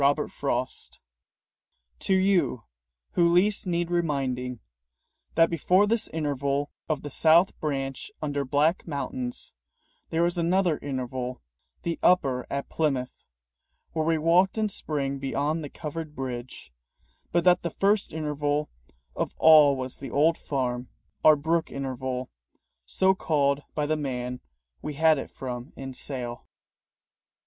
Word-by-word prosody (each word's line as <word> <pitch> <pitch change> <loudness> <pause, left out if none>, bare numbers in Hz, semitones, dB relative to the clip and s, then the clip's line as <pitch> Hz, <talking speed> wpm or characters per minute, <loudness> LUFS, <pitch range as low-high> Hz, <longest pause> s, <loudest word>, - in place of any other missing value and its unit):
J. 140 +1 +5 1.8
TO 190 - +1
YOU 180 - +2 0.5
WHO 170 -1 +3
LEAST 200 +3 +3
NEED 175 -1 -1
REMINDING 130 -7 -1 0.8
that 165 +1 +5
before 180 +5 +3
this 225 +1 0
interval 145 -2 -1 0.2
of 155 -3 -1
the 145 - -6
South 170 +4 +4
Branch 135 -3 -3
under 145 -2 -1
black 150 +7 +1
mountains, 250 - -4 0.6
there 165 +1 +1
was 175 +1 0
another 175 -1 +2
interval, 130 - -4 0.4
the 170 -1 -2
Upper 135 -8 +3
at 140 0 -3
Plymouth, 135 -5 -1 0.8
where 160 -1 0
we 165 0 +2
walked 175 +6 +3
in 215 -1 +1
spring 140 -7 -2
beyond 145 +4 -1
the 145 - -6
covered 155 0 -6
bridge; 125 - -6 0.6
but 170 0 +2
that 180 -1 +5
the 170 - -2
first 200 +4 +1
interval 150 -1 -1 0.4
of - - -2
all 150 -3 +7
was 130 -1 -6
the 135 - -6
old 155 +6 +3
farm, 125 -4 -2 0.4
our 155 - +8
brook 160 +3 0
interval, 130 -1 -4 0.6
so 190 - +3
called 145 -6 +1
by 150 - 0
the 155 +1 0
man 125 -3 -4 0.4
we 150 - -5
had 160 0 +4
it - - -6
from 125 0 -6
in 135 -1 -7
sale. 125 -3 -6
150 Hz, 130 wpm, -27 LUFS, 135-170 Hz, 1.8 s, our